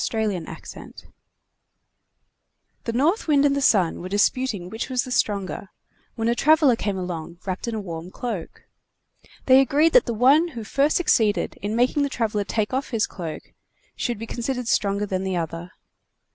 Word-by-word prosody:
Orthographic 210 -7 -3
version - - -11 1.9
The 230 - -2
North 315 - +1
Wind 290 -2 +4
and 280 -1 +3
the 280 - -1
Sun 190 -10 +3
were 180 - -6
disputing 205 -1 0
which 220 +5 -5
was 255 -1 0
the 255 - -8
stronger, 200 -5 -1 0.5
when 225 -1 -1
a 235 - +3
traveler 300 -1 +4
came 205 -3 -2
along 170 -2 -5
wrapped 185 +3 -4
in 230 - -2
a - - -2
warm 170 -3 -7
cloak. 210 -4 -6 0.8
They 260 0 +7
agreed 290 +5 +3
that - - +5
the 235 - -2
one 275 +9 +5
who 225 - -4
first 275 +7 +1
succeeded 215 - +2
in 210 +2 -2
making 250 +5 +2
the 285 - +1
traveler 220 -5 -1
take 210 +1 -1
his 255 -4 0
cloak 165 -4 -7
off - - -30 0.4
should 240 -2 -2
be 225 - -6
considered 245 +1 -3
stronger 200 -2 +1
than 190 -2 -2
the 190 -1 -2
other. 165 +1 -4
225 Hz, 175 wpm, -23 LUFS, 190-260 Hz, 1.9 s, They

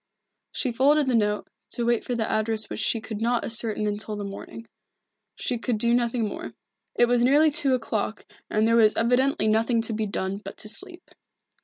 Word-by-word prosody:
She 255 - 0
folded 285 +5 +3
the 260 - 0
note, 210 -2 +1 0.3
to 240 - -2
wait 235 -1 +1
for 245 - -3
the 225 -2 -1
address 220 0 -1
which - - -4
she 225 - +1
could 220 -1 -7
not 235 +1 +1
ascertain 220 -2 +1
until 210 +1 -3
the 205 - -5
morning. 200 +3 -8 0.7
She 245 - -2
could 235 -1 -1
do 235 +2 +2
nothing 235 -2 +1
more. - - -7 0.4
It 240 - +5
was 240 0 +2
nearly 290 +5 +5
two 275 -2 +1
o'clock 220 -3 -3 0.2
and 215 +1 +2
there 230 0 +4
was 220 -2 +5
evidently 245 0 +2
nothing 225 +2 +2
to 225 - -2
be 215 0 -1
done 195 0 -3
but - - -8
to - - -8
sleep. 360 - -7
230 Hz, 195 wpm, -25 LUFS, 215-245 Hz, 0.7 s, It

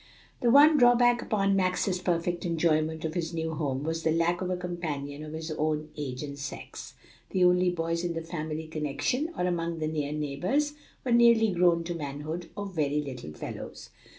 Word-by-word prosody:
The 240 - +3
one 295 +4 +7
drawback 245 -1 +5
upon 195 -3 +1
Max's 185 0 +1
perfect 175 -1 -1
enjoyment 160 -2 +1
of 160 - -2
his 165 -1 -3
new 160 0 -2
home 140 -3 -2
was 160 +1 -2
the 160 - +1
lack 170 +2 +1
of 185 - -2
a 185 - -1
companion 155 -5 -4
of 155 0 -8
his 160 0 -5
own 155 0 -1
age 135 -3 -4
and 140 -1 -7
sex; 140 - -7 0.3
the 185 - +1
only 180 0 +4
boys 165 -1 -1
in 175 -1 -1
the 165 0 -4
family 160 -1 -4
connection, 160 - -2
or 180 - 0
among 170 -2 -1
the 155 - -2
near 150 -2 -2
neighbors, 175 - -1 0.3
were 250 - 0
nearly 235 -2 +6
grown 175 -2 +3
to 175 +1 -3
manhood 155 +2 -5
or 205 - -4
very 150 -6 0
little 125 - -7
fellows. - - -8
165 Hz, 185 wpm, -28 LUFS, 155-185 Hz, 0.3 s, one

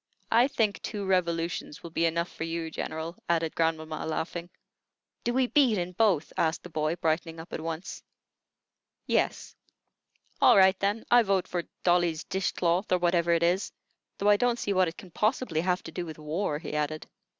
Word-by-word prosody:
"I 235 +3 +5
think 220 -7 0
two 205 -3 -4
revolutions 170 -4 -1
will 170 - -8
be 165 +1 +2
enough 170 +1 -2
for - - -5
you, 165 0 -3
General," 160 +2 -4
added 165 -2 +1
grandmamma, 160 -1 -1
laughing. 170 +2 -3 0.7
"Do 240 - 0
we 260 +1 +2
beat 250 -4 +3
in 180 0 -2
both?" 185 -5 +1
asked 160 0 0
the 180 - -10
boy, 155 +1 0
brightening 165 0 -1
up 165 +1 -10
at - - -3
once. 165 +2 -5 1.0
"Yes." - - 0 0.9
"All 240 - +7
right, 190 0 +6
then. 205 +3 -1
I 245 0 +8
vote 195 -4 +1
for 175 -2 -3 0.2
'Dolly's 175 -2 +2
Dish 190 0 -1
cloth,' 175 +3 0
or 180 - +5
whatever 175 -1 +2
it 170 0 +3
is; 180 +3 +1 0.5
though 205 - +2
I 205 - +6
don't 245 +1 +1
see 205 - -1
what 185 -1 +3
it 165 - -6
can 185 - -12
possibly 215 - 0
have 180 +1 0
to 160 - -8
do 180 - -4
with 155 - -8
war," 155 +1 -2
he 155 0 -7
added. 150 +1 -2
175 Hz, 185 wpm, -28 LUFS, 165-195 Hz, 1.0 s, I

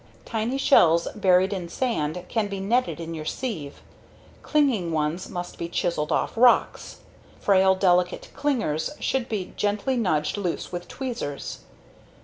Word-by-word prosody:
Tiny 230 +3 -2
shells 170 - +5
buried 190 -1 +3
in 180 -3 -5
sand 180 - -2
can 220 -3 0
be 200 -1 -5
netted 235 +2 0
in 165 0 -5
your 155 -1 -5
sieve. 155 - -5 0.6
Clinging 255 - +1
ones 155 +3 -1
must 175 -1 -6
be 170 - -4
chiseled 170 -3 -1
off - - +1
rocks. 240 +1 +3 0.4
Frail, 190 -1 +4
delicate 180 -1 +1
clingers 225 - 0
should 260 -2 -1
be 200 -5 -4
gently 210 +5 0
nudged 160 -7 0
loose 185 -4 -3
with 175 0 -5
tweezers. 240 - -5
190 Hz, 135 wpm, -25 LUFS, 170-230 Hz, 0.6 s, shells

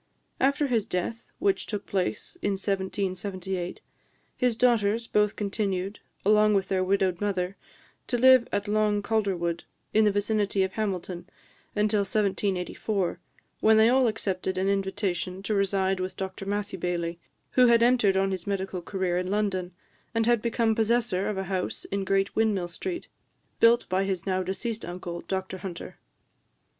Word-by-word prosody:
After 280 +2 +2
his 230 -6 0
death, 180 +5 -3
which 195 -1 0
took 210 -2 -3
place 195 - -2
in 205 - +1
1778, 190 -2 -3 0.5
his 250 -3 +1
daughters 230 -2 +2
both 210 -2 +2
continued, 200 -1 -2 0.3
along 210 0 +5
with 195 -1 0
their 185 -1 +1
widowed 190 -1 +1
mother, 190 -2 -1 0.5
to 245 - 0
live 255 0 +6
at 205 +1 -1
Long 210 -1 +1
Calderwood, 190 -6 0 0.3
in 220 - +5
the 210 - +4
vicinity 205 -1 +1
of 190 - -1
Hamilton, 185 -4 -3 0.5
until 210 0 +2
1784, 195 -2 -1 0.4
when 220 0 +5
they 220 +1 +6
all 255 0 +4
accepted 190 -4 -2
an 190 +1 +1
invitation 190 -1 -1
to 215 - -1
reside 195 -1 +1
with 185 0 -4
Dr 190 0 -5
Matthew 205 -1 -2
Baillie, 170 -1 -2 0.3
who 250 -1 +5
had 235 -1 +5
entered 235 -6 +4
on 195 0 +2
his 185 -1 -4
medical 190 -2 -2
career 180 -1 -1
in 180 0 -3
London, 195 -3 -1 0.4
and 225 0 +2
had 240 -2 +3
become 230 -1 +1
possessor 220 -4 +1
of 210 - -3
a 190 - -1
house 190 -1 -3
in 195 0 -1
Great 195 +1 +1
Windmill 205 -5 +1
Street, 345 - -5 0.5
built 235 +1 +5
by 190 +1 +1
his 190 -3 -2
now 185 -1 0
deceased 215 +5 -3
uncle, 175 -1 -6
Dr 190 0 -3
Hunter. 180 -3 -7
195 Hz, 155 wpm, -27 LUFS, 185-215 Hz, 0.5 s, live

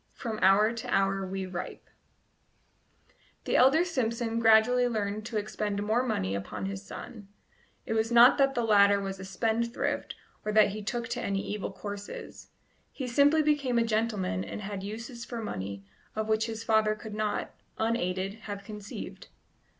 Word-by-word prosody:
"FROM 220 -3 -5
HOUR 205 +4 +5
TO 230 - -6
HOUR 195 0 +1
WE 190 0 -3
RIPE 180 -1 -6 0.8
" - - -36
The - - 0
elder 275 +7 +5
Simpson 230 -7 -1
gradually 230 +2 +5
learned 215 -2 -2
to 230 - -3
expend 205 -1 -2
more 220 +4 +2
money 95 - -1
upon 100 +1 -4
his 95 0 -5
son; 215 - -9 0.6
it - - -2
was 225 +1 0
not 240 +4 +7
that 275 0 +3
the 240 - +1
latter 200 -2 +5
was 195 -1 -4
a - - -7
spendthrift 225 +5 -1 0.3
or 215 - -1
that 215 -1 +6
he 210 +2 -5
took 230 +3 -3
to - - -2
any 195 0 -1
evil 205 -1 -4
courses 200 +2 -8 0.4
he 265 - -5
simply 290 +5 +4
became 285 -5 +1
a 235 - +4
gentleman 215 - 0
and 100 - -6
had 200 -1 -5
uses 230 +4 -6
for 235 -1 -6
money 100 - -5 0.3
of 220 0 -2
which 220 +1 +1
his 225 0 -5
father 220 -1 +3
could 215 0 -9
not, 215 0 -2 0.3
unaided, 195 -4 -1 0.2
have 200 -1 -5
conceived. 210 0 -8
215 Hz, 165 wpm, -29 LUFS, 195-235 Hz, 0.8 s, not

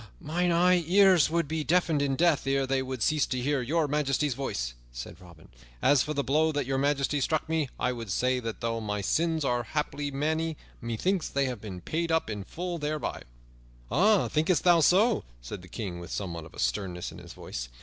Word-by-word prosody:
"Mine 175 +4 0 0.4
ears 185 -4 +6
would 170 -1 0
be 160 +1 -2
deafened 165 -2 +2
in 140 -1 +1
death 165 -3 +2
ere 135 0 +2
they 135 0 0
would 130 -3 -3
cease 155 -2 +2
to 130 - -2
hear 140 +2 0
Your 155 +5 +1
Majesty's 145 -1 +1
voice," 65 - -3 0.2
said 60 +9 -8
Robin. 85 -3 -15 0.3
"As 140 - +4
for 150 - -2
the 140 - 0
blow 155 +4 +2
that 145 -2 -1
Your 135 +1 -1
Majesty 140 0 +1
struck 155 +3 0
me, 160 -4 0
I 125 - +1
would 115 -4 -6
say 125 +7 +1
that 115 -1 -5
though 115 -1 -1
my 105 -1 -2
sins 160 +6 +1
are 120 -2 +1
haply 145 +3 -3
many, 155 +3 -1 0.2
methinks 155 - -1
they 140 0 +1
have 125 -5 -4
been 95 -4 -7
paid 165 - -2
up 160 -8 +1
in 105 -2 -4
full 175 - -5
thereby." 150 0 -3 1.1
"Thinkest 160 +3 +1
thou 175 -2 +6
so?" 200 +8 +4 0.2
said 65 +11 -8
the 90 - -13
King 90 -1 -5
with 85 - -9
somewhat 85 -5 -4
of 80 - -13
sternness 90 +9 -2
in - - -11
his - - -11
voice. - - -6
140 Hz, 200 wpm, -28 LUFS, 115-160 Hz, 1.1 s, ears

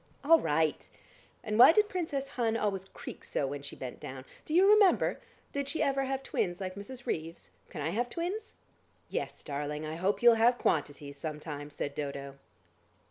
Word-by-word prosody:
"All 325 +3 +7
right. 155 - 0 0.5
And 215 -1 -1
why 250 - +11
did 420 +3 +4
Princess 320 -8 -3
Hun 230 -2 0
always 195 -3 -1
creak - - -10
so - - -1
when 140 +1 -4
she 140 - -8
bent 125 -2 -7
down. 130 0 -8 0.2
Do 305 - -5
you 375 +3 +6
remember? 415 -2 +5 0.3
Did 280 -1 -2
she 320 - 0
ever 275 -1 +1
have 270 0 -2
twins 175 -8 -1
like 185 -1 -4
Mrs. 240 +6 -9
Reeves? 165 +1 -4 0.2
Can - - -6
I 155 +3 -1
have 240 +5 -1
twins?" 370 - -4 0.5
"Yes, - - -4
darling, 150 +1 -4
I 155 +1 -4
hope 195 +6 0
you'll 240 -1 +9
have 240 +2 +5
quantities 145 -5 -1
some 155 -1 -4
time," 145 -2 -6
said 145 -1 -4
Dodo. 140 -1 -5
195 Hz, 185 wpm, -31 LUFS, -, 0.5 s, why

